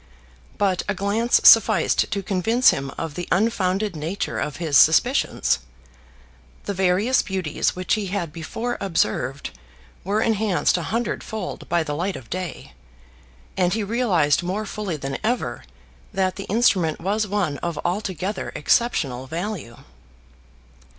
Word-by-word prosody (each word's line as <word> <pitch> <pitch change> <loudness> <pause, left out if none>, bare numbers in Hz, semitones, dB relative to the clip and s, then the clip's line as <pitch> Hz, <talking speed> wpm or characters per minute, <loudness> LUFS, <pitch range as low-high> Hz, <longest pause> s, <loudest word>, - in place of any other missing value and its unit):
But 190 -3 +1
a 205 - 0
glance 210 +5 +2
sufficed 220 -5 +6
to 200 -1 -2
convince 220 +7 +3
him 135 0 -4
of 165 -2 -4
the 175 +3 -5
unfounded 195 -1 +1
nature 160 +6 -3
of 150 - -3
his 160 -3 -2
suspicions. 60 - +4 1.0
The 200 - -3
various 190 +7 +2
beauties 185 -6 -2
which 185 0 -1
he 215 -3 0
had 180 -5 -3
before 225 +9 -4
observed 140 - -1 0.5
were 200 +3 0
enhanced 215 -4 +1
a 175 - -1
hundredfold 220 -3 -4
by 170 -1 +2
the 150 -2 -4
light 180 +6 -2
of 130 -4 -11
day, 175 - -5 0.8
and 180 -1 +1
he 220 - -1
realised 195 - +2
more 190 +5 -3
fully 200 -5 -4
than 135 -1 -4
ever 240 +3 -2 0.5
that 190 -2 0
the 195 - -6
instrument 190 -7 +2
was 210 +4 -1
one 185 -8 -1
of 170 -3 -3
altogether 190 +1 -2
exceptional 140 - +1
value. 170 - -5
185 Hz, 135 wpm, -23 LUFS, 165-210 Hz, 1.0 s, sufficed